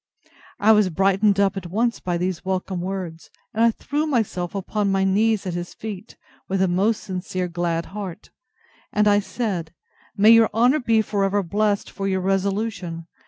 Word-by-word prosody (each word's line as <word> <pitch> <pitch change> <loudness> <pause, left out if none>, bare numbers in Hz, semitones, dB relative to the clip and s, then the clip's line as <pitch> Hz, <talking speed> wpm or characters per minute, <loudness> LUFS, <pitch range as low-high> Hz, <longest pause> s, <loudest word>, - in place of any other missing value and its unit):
I 215 +2 +5
was 210 -3 +4
brightened 195 +3 +2
up 200 0 +2
at 190 -3 -5
once 230 +5 0
with 175 -1 -1
these 180 -2 -2
welcome 185 -1 -2
words, 180 -3 -5 0.2
and 225 - +2
I 230 - +6
threw 295 +7 -2
myself 205 - -1
upon 200 +1 -1
my 195 0 +2
knees 210 +2 +2
at 180 - -3
his 175 0 -5
feet, 215 -1 -8 0.3
with 195 0 0
a 190 - +3
most 195 +5 +1
sincere 185 -1 -3
glad 170 -1 -2
heart; 200 -2 -7 0.6
and 210 0 +2
I 205 0 +5
said, 190 -6 -4 0.4
May 210 +3 +7
your 230 -1 +6
honour 250 +6 +4
be 225 -4 +2
for 205 -2 -1
ever 195 +1 +1
blessed 205 +3 0
for 195 - -4
your 190 -1 0
resolution! 195 -3 -2
195 Hz, 175 wpm, -23 LUFS, 185-215 Hz, 0.6 s, May